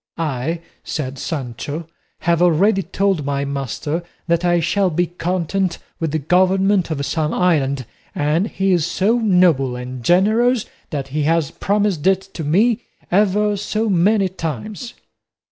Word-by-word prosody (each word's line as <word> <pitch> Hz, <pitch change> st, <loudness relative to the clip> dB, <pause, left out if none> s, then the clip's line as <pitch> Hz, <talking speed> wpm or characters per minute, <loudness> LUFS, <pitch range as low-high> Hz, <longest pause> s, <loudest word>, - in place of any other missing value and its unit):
"I," 160 Hz, +1 st, -2 dB, 0.2 s
said 140 Hz, -3 st, -4 dB
Sancho, 145 Hz, +2 st, -4 dB, 0.4 s
"have 170 Hz, 0 st, +2 dB
already 190 Hz, +4 st, +4 dB
told 190 Hz, -1 st, 0 dB
my 140 Hz, 0 st, -1 dB
master 140 Hz, +4 st, -3 dB, 0.2 s
that 170 Hz, 0 st, +1 dB
I 175 Hz, -1 st, +3 dB
shall 185 Hz, +4 st, +1 dB
be 175 Hz, +2 st, +1 dB
content 180 Hz, +1 st, -2 dB, 0.2 s
with 165 Hz, -, -1 dB
the 155 Hz, -, -1 dB
government 185 Hz, +4 st, +2 dB
of 140 Hz, -3 st, -2 dB
some 155 Hz, 0 st, -1 dB
island, 140 Hz, -7 st, +1 dB, 0.3 s
and 155 Hz, +7 st, +1 dB
he 195 Hz, -2 st, 0 dB
is 175 Hz, -3 st, +3 dB
so 220 Hz, +6 st, +1 dB
noble 180 Hz, -, +3 dB
and 125 Hz, 0 st, -7 dB
generous 220 Hz, -, +3 dB, 0.2 s
that 140 Hz, -3 st, -4 dB
he 150 Hz, +3 st, -1 dB
has 165 Hz, -3 st, +1 dB
promised 200 Hz, -5 st, 0 dB
it 190 Hz, 0 st, +4 dB
to 165 Hz, -, -5 dB
me 210 Hz, +10 st, +2 dB, 0.3 s
ever 205 Hz, +2 st, +3 dB
so 215 Hz, +2 st, -1 dB
many 195 Hz, +3 st, +3 dB
times." 185 Hz, -, -5 dB
175 Hz, 145 wpm, -20 LUFS, 150-195 Hz, 0.4 s, already